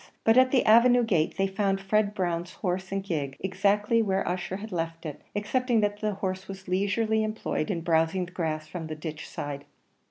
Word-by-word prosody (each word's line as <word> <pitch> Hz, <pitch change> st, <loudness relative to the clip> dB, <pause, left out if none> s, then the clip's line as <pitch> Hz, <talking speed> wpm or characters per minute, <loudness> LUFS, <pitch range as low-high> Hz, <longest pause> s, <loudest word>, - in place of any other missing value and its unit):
But 225 Hz, -, +5 dB
at 255 Hz, 0 st, +6 dB
the 255 Hz, -1 st, +2 dB
avenue 240 Hz, +2 st, +6 dB
gate 175 Hz, -8 st, +1 dB
they 195 Hz, -, +2 dB
found 195 Hz, 0 st, 0 dB
Fred 205 Hz, +1 st, +1 dB
Brown's 175 Hz, -2 st, -2 dB
horse 185 Hz, 0 st, -3 dB
and 195 Hz, 0 st, -1 dB
gig, 150 Hz, -8 st, -3 dB
exactly 205 Hz, +4 st, +2 dB
where 195 Hz, -3 st, 0 dB
Ussher 180 Hz, +1 st, -2 dB
had 215 Hz, +2 st, -8 dB
left 165 Hz, -1 st, -3 dB
it, 150 Hz, -3 st, -6 dB
excepting 235 Hz, +3 st, +1 dB
that 205 Hz, 0 st, 0 dB
the 210 Hz, -2 st, -1 dB
horse 190 Hz, -1 st, -3 dB
was 195 Hz, 0 st, -9 dB
leisurely 205 Hz, +4 st, +1 dB
employed 215 Hz, -7 st, -2 dB
in 175 Hz, -5 st, -1 dB
browsing 165 Hz, +2 st, +1 dB
the 180 Hz, -, -14 dB
grass 155 Hz, -4 st, -2 dB
from 160 Hz, +1 st, -6 dB
the 155 Hz, -, -5 dB
ditch 155 Hz, 0 st, -7 dB
side. 140 Hz, -1 st, -5 dB
190 Hz, 195 wpm, -27 LUFS, 170-210 Hz, -, at